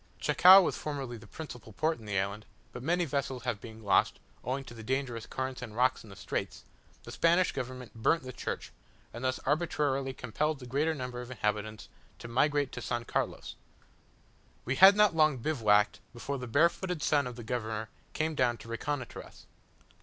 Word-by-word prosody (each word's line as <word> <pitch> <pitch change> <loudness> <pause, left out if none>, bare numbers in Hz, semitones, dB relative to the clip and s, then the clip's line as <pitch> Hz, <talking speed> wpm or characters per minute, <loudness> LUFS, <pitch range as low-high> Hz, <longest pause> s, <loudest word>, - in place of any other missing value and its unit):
Chacao 190 +2 +8
was - - -1
formerly 140 -5 -4
the - - -14
principal 125 -8 -9
port 160 +6 0
in 110 - -13
the 100 -2 -2
island; 100 +3 -3 0.2
but 125 - -8
many 175 +6 +1
vessels 135 -4 -3
having 120 -5 -2 0.2
been 110 - -14
lost, 100 - +2 0.2
owing 130 +3 -2
to 120 - -11
the 115 - -10
dangerous 125 -1 -2
currents 130 0 -4
and 115 -4 -8
rocks 130 +2 +2
in 110 - -14
the 100 - -11
straits, - - -4 0.4
the - - -9
Spanish 170 +2 +3
government 130 -1 -6
burnt 115 +8 +1
the 130 0 -7
church, - - -5 0.4
and 120 - -7
thus 130 0 0
arbitrarily 145 -3 0
compelled 140 +5 -2
the 130 - -10
greater 145 +6 0
number 125 -2 -5
of 125 - -9
inhabitants 105 -2 -3 0.3
to - - -9
migrate 145 +3 +1
to - - -6
S. 120 +1 -3
Carlos. - - -2 1.1
We 130 - 0
had 195 +1 +9
not 210 -4 +4
long 155 -3 +4
bivouacked, 110 -7 +2
before 135 +3 -4
the 125 - -6
barefooted 170 +5 +1
son 145 -3 +2
of 125 - -7
the 120 - -8
governor 110 -2 -3 0.2
came 160 +1 -1
down 125 -4 +1
to - - -13
reconnoitre 130 +2 -4
us. - - -16
130 Hz, 185 wpm, -30 LUFS, 115-150 Hz, 1.1 s, had